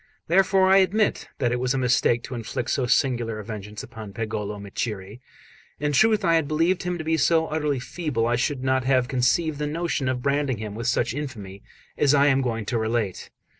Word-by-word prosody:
Therefore 190 +2 +3
I 190 +1 +6
admit 200 +3 +1
that 120 -3 0
it 125 - 0
was 125 +1 0
a - - 0
mistake 120 -2 +2
to - - -7
inflict 120 0 -4
so 130 -3 0
singular 120 -4 +1
a 105 - -7
vengeance 105 -1 -7
upon 110 -3 -9
Pagolo 105 -1 -4
Micceri. 100 +2 -5 0.6
In 150 +1 0
truth, 215 +7 +3
had 175 - +2
I 165 -1 +4
believed 165 +5 +1
him 180 0 -2
to 160 - -5
be 160 +1 +1
so 160 +2 +3
utterly 150 -3 -1
feeble, 130 -4 -2
I 120 +1 +1
should 130 +2 -1
not 130 0 +1
have 130 -1 +2
conceived 140 +5 +1
the 150 - -1
notion 150 -4 -1
of 125 -1 -2
branding 140 -3 0
him 105 -1 -6
with 115 +3 -4
such 120 -1 +1
infamy 110 -9 -7 0.4
as 145 -1 +4
I 140 0 +5
am 135 -1 +3
going 115 -4 -2
to 115 +2 -1
relate. 110 -4 -2
130 Hz, 210 wpm, -24 LUFS, 115-155 Hz, 0.6 s, I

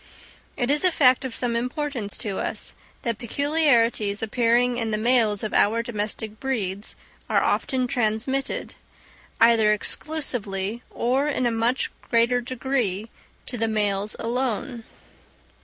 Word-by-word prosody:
It 245 +2 +1
is 295 +3 +2
a 365 - +6
fact 260 -6 +4
of 245 -3 -4
some 240 -2 -1
importance 250 -3 -2
to 200 -3 -4
us, - - -2 0.3
that 230 -3 -2
peculiarities 235 -6 +2
appearing 240 +2 +2
in 225 -1 -1
the 215 - 0
males 225 -3 +2
of 215 - -3
our 230 +3 +3
domestic 215 -1 -3
breeds 210 -7 -2 0.3
are - - +3
often 260 -1 0
transmitted, 245 +3 -1 0.7
either 225 -2 +5
exclusively 215 -4 -1
or 260 +4 0
in 270 -4 0
a 240 - +2
much 230 +3 0 0.2
greater 240 +1 +3
degree, 235 -5 -2 0.3
to 245 - -4
the 225 - +1
males 205 -1 0
alone. 240 0 -2
235 Hz, 130 wpm, -24 LUFS, 215-255 Hz, 0.7 s, a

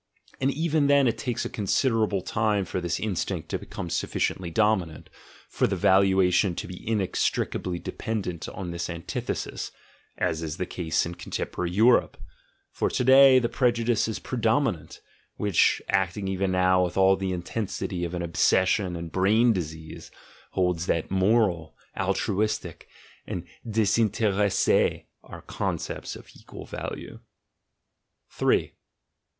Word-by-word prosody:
And 135 - +1
even 155 0 +1
then 140 -2 +5
it 115 - -1
takes 120 -2 -2
a - - 0
considerable 110 -2 0
time 105 0 0
for 90 - -3
this 85 -1 -2
instinct 105 -6 -3
to - - -2
be - - -12
come - - -6
sufficiently 90 -2 -1
dominant, 95 -4 0 0.4
for - - 0
the - - -1
valuation 95 -1 +3
to - - -4
be 90 0 -8
inex 105 -4 -1 0.2
tricably 90 -1 -3
dependent 95 -3 -4
on 90 -2 -6
this 85 +1 -4
antithesis 85 -1 -4 0.5
(as 80 0 -1
is 80 0 -4
the 90 - -2
case 80 -3 -1
in 85 - -5
contemporary 90 0 -4
Europe); 110 +7 +3 0.5
for - - -1
to - - -1
day 130 +1 +8
the 120 -2 +2
prejudice 120 -2 +1
is 110 - -3
pre 125 - -5
dominant, 115 - 0 0.3
which, 100 -5 +2
acting 95 +1 0
even 95 0 -1
now 90 0 +3
with 90 0 -3
all 95 0 +5
the 95 -1 -3
intensity 90 0 -3
of 85 +1 -3
an 90 - -3
obsession 95 +2 +2
and 85 -1 -6
brain 110 +5 +3
disease, 80 -3 -6 0.4
holds 90 -2 0
that 85 - -1
"moral," 95 -4 +1 0.2
"altruistic," 105 -4 -1 0.4
and - - -4 0.3
"desinteresse" 105 -2 +2 0.2
are - - -11
concepts - - -4
of - - -12
equal - - -11
value. - - -7
95 Hz, 135 wpm, -26 LUFS, 90-110 Hz, 0.5 s, day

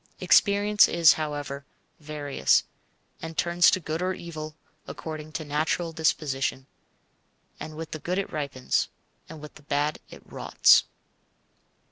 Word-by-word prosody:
Experience 205 0 +4
is, 170 -2 +5
however, 145 -2 -5 0.4
various, 145 - +1 0.6
and 160 0 -7
turns 175 0 +4
to - - +1
good 160 0 -4
or 185 0 -1
evil 155 -3 -8 0.3
according 155 -1 -7
to 155 0 -5
natural 155 +3 -1
disposition. 135 -4 -1 0.9
With 160 +1 -7
the 155 - -5
good 180 +5 -3
it 195 - -3
ripens, 140 -4 -1 0.4
with 150 -2 -10
the - - -16
bad 145 +1 -1
it - - -13
rots. - - +4
155 Hz, 120 wpm, -26 LUFS, 145-170 Hz, 0.9 s, is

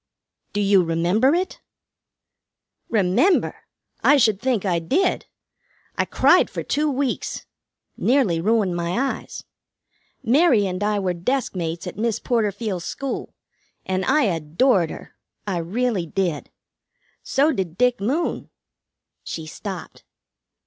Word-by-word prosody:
"Do 205 - -1
you 200 -1 +5
remember 175 - +2
it?" 370 +2 -3 1.3
"Remember! 215 - +2 0.4
I 290 - +6
should 220 -6 +3
think 245 -6 0
I 175 -3 +1
did. 315 - 0 0.7
I - - +1
cried - - +4
for - - -5
two 300 +1 0
weeks. 270 -2 -2 0.5
Nearly 235 -11 +2
ruined 205 -2 +1
my 170 +1 -2
eyes. 270 0 -3 0.8
Mary 250 -4 +4
and 185 +1 -3
I 210 0 +1
were 190 -3 0
deskmates 175 -4 -2
at - - -7
Miss 230 0 0
Porterfield's 210 -5 -1
school, 275 +6 -5 0.5
and 190 0 -1
I 300 +3 +3
adored 170 - +2
her. - - -10 0.3
I 195 -4 -2
really 195 +1 -1
did. 170 -4 -2 0.7
So 290 +4 +2
did 185 - -3
Dick 250 +1 +2
Moon." 280 +12 -1 0.7
She 160 - -6
stopped. 180 +1 -8
205 Hz, 120 wpm, -22 LUFS, 180-255 Hz, 1.3 s, I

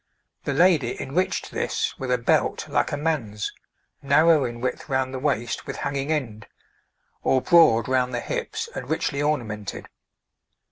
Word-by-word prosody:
The 140 - 0
lady 155 -7 +3
enriched 175 +8 -1
this - - -1
with 130 - -4
a 125 - +3
belt 120 - +1
like - - 0
a 145 - -1
man's, 130 -10 -2 0.5
narrow 150 +2 +4
in 120 0 -5
width 125 +4 -3
round 130 -1 0
the 130 - -3
waist 130 -4 -1
with - - -4
hanging 140 +1 -2
end, 115 -9 -3 0.7
or 130 - +3
broad 140 -8 +5
round 125 -1 +1
the 125 - -2
hips 465 -2 -4
and - - -6
richly 140 0 -1
ornamented. 110 -9 -3
135 Hz, 150 wpm, -24 LUFS, 120-155 Hz, 0.7 s, broad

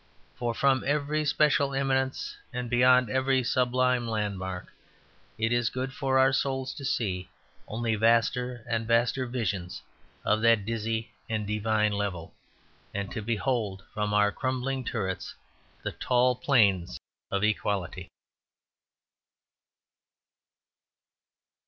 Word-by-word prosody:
For 120 -1 -2
from 135 -1 +3
every 150 +2 0
special 140 -1 +2
eminence 130 -1 0 0.2
and 125 -1 -4
beyond 125 -1 +5
every 130 0 +2
sublime 125 0 +1
landmark, 100 -4 -3 0.6
it 115 +1 0
is 120 -1 +2
good 130 +2 -4
for 135 -1 0
our 130 0 +5
souls 130 -1 -1
to 145 - -9
see 95 -9 -1 0.4
only 115 +1 -1
vaster 115 +2 +2
and 115 -1 -1
vaster 120 +2 +2
visions 100 -7 -3 0.4
of 110 0 +2
that 115 -3 +4
dizzy 115 0 -2 0.2
and 110 -2 -1
divine 105 +1 +1
level; 100 -5 -3 0.6
and 100 -1 -3
to 110 - -4
behold 110 -3 -1
from 105 -1 -1
our 105 0 +3
crumbling 130 +2 -2
turrets 95 -6 -3 0.5
the - - -2
tall 125 0 +2
plains 100 - +2 0.3
of 100 +1 -1
equality. 105 -4 -1
115 Hz, 115 wpm, -28 LUFS, 105-130 Hz, 0.6 s, beyond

